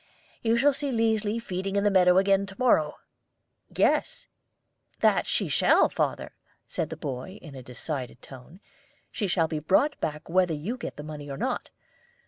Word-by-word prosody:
You 230 0 +2
shall 285 +4 +4
see 280 +1 -2
Liesli 225 -2 +1
feeding 195 -3 -4
in 200 - +2
the 205 - +3
meadow 180 -1 +5
again 195 0 +3
to 195 - -10
morrow." 160 -12 +3 0.7
"Yes, - - +1 0.8
that - - +3
she - - +1
shall, - - +4
father," - - -2 0.3
said 155 - -2
the 160 - -6
boy, 145 +6 -6
in 155 -4 -12
a 130 - -8
decided 125 +1 -5
tone. 135 +8 -13 0.5
"She 205 - -2
shall 170 -3 +2
be 155 -1 -3
brought 195 - +2
back 150 0 -3
whether 180 -1 +2
you 180 +12 -4
get 255 - -7
the 150 - -7
money 150 -1 -8
or 135 - -5
not. - - -2
185 Hz, 170 wpm, -27 LUFS, 150-210 Hz, 0.8 s, meadow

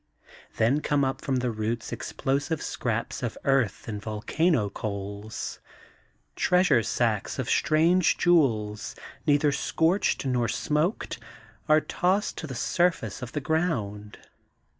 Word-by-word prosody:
Then 125 +7 +3
come 145 -2 +1
up 130 - -2
from 135 - -1
the 125 -1 0
roots 110 +1 -3
explosive 140 +7 -2
scraps 115 -1 -2
of 120 -3 -3
earth 135 -7 +1
and 105 -2 -4
volcano 110 - +1
coals. 100 +1 -5 0.8
Treasure 180 -9 +4
sacks 110 -1 -1
of - - -2
strange 165 +3 +3
jewels, 110 -12 +2 0.3
neither 145 0 +4
scorched 160 +4 +1
nor 125 -2 +1
smoked, 150 - -1 0.5
are 155 0 +6
tossed 190 +6 0
to 160 - -5
the 130 - -6
surface 170 - 0
of 125 -1 -7
the 150 - -2
ground. 115 - -2
130 Hz, 120 wpm, -27 LUFS, 110-160 Hz, 0.8 s, are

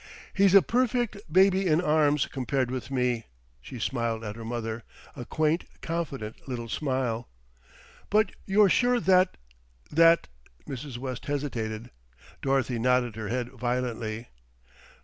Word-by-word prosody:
"He's 195 -1 +4
a 195 - +9
perfect 235 - 0
baby 190 +2 +4
in 155 -1 +4
arms 150 -4 +3
compared 130 -1 -1
with 130 -1 -4
me," 125 -3 0 0.4
she 125 - -9
smiled 115 -1 -2
at 105 -1 -5
her 115 - -8
mother, 115 0 -4 0.3
a 120 - -7
quaint 155 +5 0 0.2
confident 140 -11 -4
little 120 -2 -4
smile. 125 -3 -2 0.8
"But 215 -1 +3 0.2
you're 205 +1 +5
sure 245 +5 +3
that 185 0 +3 0.5
that 165 +2 +5 0.2
" - - -33
Mrs. 135 -1 -6
West 130 -1 -5
hesitated. 120 -6 -3 0.5
Dorothy 135 -3 +1
nodded 125 -1 +2
her 110 -1 -5
head 120 +2 -2
violently. 120 -2 -3
130 Hz, 130 wpm, -27 LUFS, 120-165 Hz, 0.8 s, a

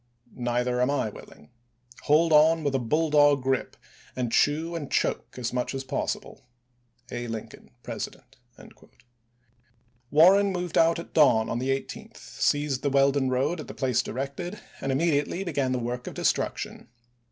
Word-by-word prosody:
Neither 125 0 -1
am 125 - +2
I 140 -6 0
LiGm?t,to - - -17
willing. 75 - -14 0.6
Hold 155 +2 +4
on 160 +1 +5
with 140 -2 0
a 135 - +1
bulldog 145 +1 +3
grip, 130 0 -1 0.4
and 125 -2 -2
chew 160 +6 +1
and 155 -4 -4
isu.s' - - -8
ms. - - +5
choke - - -3
as 125 -1 -3
much 125 +2 -2
as 135 - -4
possible. 130 - -4 0.3
— 120 0 -28
A. 120 0 -4
Lincoln, 115 -2 -8
President." - - -7 1.7
Warren 190 +7 +5
moved 180 -2 -4
out 165 0 +4
at 170 - -9
dawn 125 -8 +4
on 120 - -2
the 130 +2 -2
18th, 135 0 -4
seized 145 -3 -1
the 140 - 0
Weldon 140 -1 +2
road 135 +7 0
at 155 - -7
the - - -9
place 125 -3 +1
directed, 140 - -5 0.2
and 135 - -2
immedi 145 +1 +2
ately 190 +6 -5
began 140 -6 -1
the 130 - 0
work 125 +1 -4
of - - -6
destruction. - - -2
135 Hz, 170 wpm, -26 LUFS, 125-155 Hz, 1.7 s, on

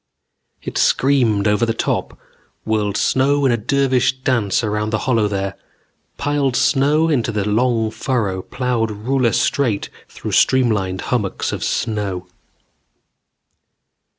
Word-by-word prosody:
It - - -3
screamed 120 -7 +2
over 105 +3 +2
the 115 -1 0
top, - - -2 0.5
whirled 105 -2 0
snow 140 +2 +2
in 130 - +4
a - - +3
dervish 130 +2 +1
dance 120 -6 +1
around 105 0 -1
the 110 - 0
hollow 115 -5 +2
there, 100 -1 -3 0.6
piled 140 -2 0
snow 150 +4 +3
into 125 -7 0
the 105 -2 -2
long 110 0 +1
furrow 110 -5 -2
plowed 125 0 -2
ruler 120 +3 0
straight 115 -6 0 0.2
through - - -7
streamlined 105 -8 +2
hummocks 105 -6 -1
of - - -4
snow. 100 -5 -2
115 Hz, 125 wpm, -19 LUFS, 105-130 Hz, 0.6 s, in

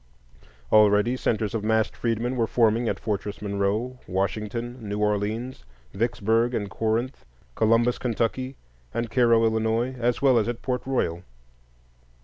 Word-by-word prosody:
Already 105 +3 +5
centres 110 -4 -1
of 110 -2 -2
massed 110 0 +1
freedmen 120 +2 -1
were 115 -2 +1
forming 115 0 +2
at - - -2
Fortress 105 -1 -3
Monroe, 105 +5 -2
Washington, 105 +6 -3
New 105 - -2
Orleans, 105 +4 -1 0.3
Vicksburg 115 +2 +1
and 100 -2 -3
Corinth, 115 +4 -1 0.3
Columbus, 115 - +2
Ky., 125 +2 -1 0.4
and 115 -1 -2
Cairo, 115 -2 +4
Ill., 110 +3 0
as 120 0 +1
well 130 -4 +4
as 110 - -1
at 120 -1 -4
Port 125 -1 -1
Royal. 85 -10 -1
115 Hz, 130 wpm, -25 LUFS, 105-120 Hz, 0.4 s, Already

